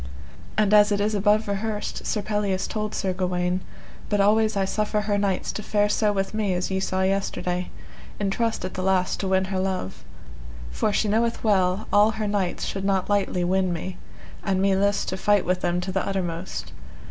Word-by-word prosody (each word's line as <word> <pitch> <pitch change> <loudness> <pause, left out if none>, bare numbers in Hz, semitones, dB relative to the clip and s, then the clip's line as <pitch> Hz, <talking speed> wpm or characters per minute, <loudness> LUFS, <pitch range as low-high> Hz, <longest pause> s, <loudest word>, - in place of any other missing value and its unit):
And 210 -1 +3
as 210 0 +6
it 205 - +1
is 210 +1 +1
above 210 +1 +2
rehearsed, 210 +1 -3
Sir 210 - -1
Pelleas 205 -2 -1
told 215 -1 -3
Sir 190 -1 -1
Gawaine: 180 0 -1 0.5
But 205 - +1
always 215 +1 +3
I 195 - +2
suffer 210 +2 0
her 205 -1 0
knights 195 -2 0
to - - -5
fare 210 0 +1
so 210 0 +2
with 195 0 -2
me 210 -4 0
as 180 +2 -2
ye 190 - 0
saw 190 0 -1
yesterday, 180 -2 -1 0.5
in 200 -1 0
trust 225 -1 -1
at 185 - -5
the 185 - -4
last 185 -1 +1
to 195 - -2
win 190 0 +2
her 190 - 0
love, 185 - -3 0.7
for 65 - 0
she 210 - +1
knoweth 230 +3 +1
well 190 -1 +2
all 205 +1 +6
her 215 -1 -1
knights 200 -3 -1
should 195 - -3
not 195 0 0
lightly 195 -3 +1
win 185 +1 +1
me, 180 +2 -5 0.4
an 190 -2 0
me 195 0 +3
list 200 +1 +1
to 185 - -3
fight 205 0 +2
with 180 +1 0
them 175 0 0
to 190 +1 -4
the 190 0 0
uttermost. 185 -2 -3
195 Hz, 200 wpm, -24 LUFS, 185-210 Hz, 0.7 s, as